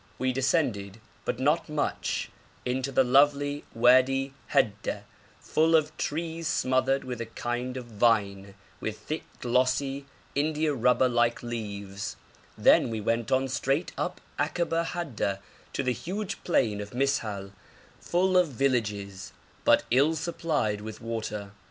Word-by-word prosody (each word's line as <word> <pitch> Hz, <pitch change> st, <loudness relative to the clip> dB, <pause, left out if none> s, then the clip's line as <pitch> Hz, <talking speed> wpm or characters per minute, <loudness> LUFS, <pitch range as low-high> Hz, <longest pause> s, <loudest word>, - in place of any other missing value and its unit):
We 130 Hz, 0 st, 0 dB
descended, 120 Hz, -, 0 dB, 0.3 s
but -, -, -1 dB
not 150 Hz, +5 st, +1 dB
much, 150 Hz, -1 st, -2 dB, 0.3 s
into 130 Hz, +2 st, -1 dB
the 130 Hz, -, +4 dB
lovely 145 Hz, +2 st, +3 dB
Wadi 130 Hz, +3 st, +4 dB, 0.2 s
Hadda, 105 Hz, 0 st, +1 dB, 0.4 s
full 160 Hz, +1 st, +2 dB
of 155 Hz, -1 st, +2 dB
trees 165 Hz, +2 st, -3 dB
smothered 130 Hz, -2 st, +2 dB
with 125 Hz, -2 st, -5 dB
a 115 Hz, -, -4 dB
kind 120 Hz, +3 st, -3 dB
of 125 Hz, -, -6 dB
vine 100 Hz, -3 st, +1 dB, 0.2 s
with 110 Hz, 0 st, -4 dB
thick 155 Hz, -, -4 dB, 0.2 s
glossy 130 Hz, +3 st, +1 dB, 0.3 s
indiarubber 140 Hz, -4 st, +2 dB
like 120 Hz, -1 st, +1 dB
leaves; 100 Hz, -4 st, -5 dB, 0.4 s
then -, -, +5 dB
we 110 Hz, -1 st, -3 dB
went 115 Hz, +1 st, -1 dB
on 130 Hz, 0 st, +3 dB
straight 135 Hz, +4 st, 0 dB
up -, -, -3 dB, 0.2 s
Akaba 170 Hz, -1 st, 0 dB
Hadda 140 Hz, -, -2 dB, 0.4 s
to -, -, -1 dB
the 125 Hz, -1 st, +1 dB
huge 195 Hz, -, -5 dB
plain 105 Hz, -, +1 dB
of 105 Hz, +3 st, -8 dB
Mis'hal, 110 Hz, -8 st, -1 dB, 0.5 s
full 185 Hz, +1 st, +2 dB
of 180 Hz, -1 st, +5 dB
villages, 105 Hz, -8 st, -1 dB, 0.3 s
but -, -, +5 dB
ill 140 Hz, +6 st, +4 dB
supplied 155 Hz, -, -1 dB
with 110 Hz, 0 st, -7 dB
water. 110 Hz, -3 st, -4 dB
130 Hz, 130 wpm, -28 LUFS, 110-145 Hz, 0.5 s, then